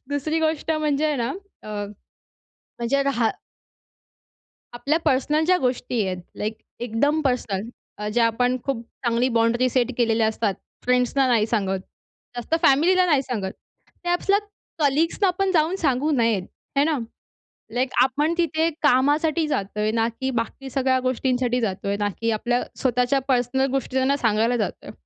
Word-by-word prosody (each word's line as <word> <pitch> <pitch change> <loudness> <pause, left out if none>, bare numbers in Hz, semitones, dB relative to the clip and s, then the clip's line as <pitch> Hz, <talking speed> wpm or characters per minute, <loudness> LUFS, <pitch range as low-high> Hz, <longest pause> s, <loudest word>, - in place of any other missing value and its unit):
दुसरी 310 +3 -1
गोष्ट 320 0 0
म्हणजे 305 -1 +1
आहे 300 -2 0
ना 240 +1 -1 0.3
अ, - - -10 1.1
म्हणजे 260 +4 +1
रहा 245 -5 +1 1.4
आपल्या 275 +7 0
पर्सनल 300 +4 +2
ज्या 365 +2 +4
गोष्टी 250 -3 -1
आहेत, 185 -1 -3 0.2
लाइक 215 +1 -2 0.3
एकदम 285 +7 +1
पर्सनल 225 -6 -1 0.3
अ, 210 0 -3
ज्या 235 +1 +3
आपण 245 +2 +1
खूप 270 -4 -1 0.2
चांगली 235 +2 +2
बाँडनी 235 +2 +3
सेट 250 -1 +1
केलेल्या 225 -2 +3
असतात 215 -2 -1 0.3
फ्रेंड्सना 250 +2 +2
नाही 225 -3 +3
सांगत 195 -4 -1 0.6
जास्त, 240 +6 -2
फॅमिलीला 355 +7 +5
नाही 290 -5 +3
सांगत. 210 -8 -3 0.5
त्या 350 - 0
आपल्या 395 +3 +2 0.4
कलीग्स 305 +2 +1
ना - - +6
आपण 380 +2 0
जाऊन 325 +3 +2
सांगू 280 0 +1
नयेत, 230 -7 +2 0.4
है 280 - +5
ना. 310 -2 +1 0.8
लाइक 255 +1 0
आपण 290 +5 +1
तिथे 325 -1 +1
कामासाठी 295 +4 +3
जातोय 210 -4 -1
ना 225 0 +1
की 265 - -1
बाकी 270 +3 -8
सगळ्या 260 0 +1
गोष्टींसाठी 250 -1 0
जातोय, 200 -1 -2
ना 205 0 0
की 230 0 +1
आपल्या 240 +3 0 0.2
स्वतःच्या 250 +1 +2
पर्सनल 255 +1 +2
गोष्टींना 265 +1 0
सांगायला 230 0 +2
जातोय 215 - -4
255 Hz, 145 wpm, -23 LUFS, 230-290 Hz, 1.4 s, ना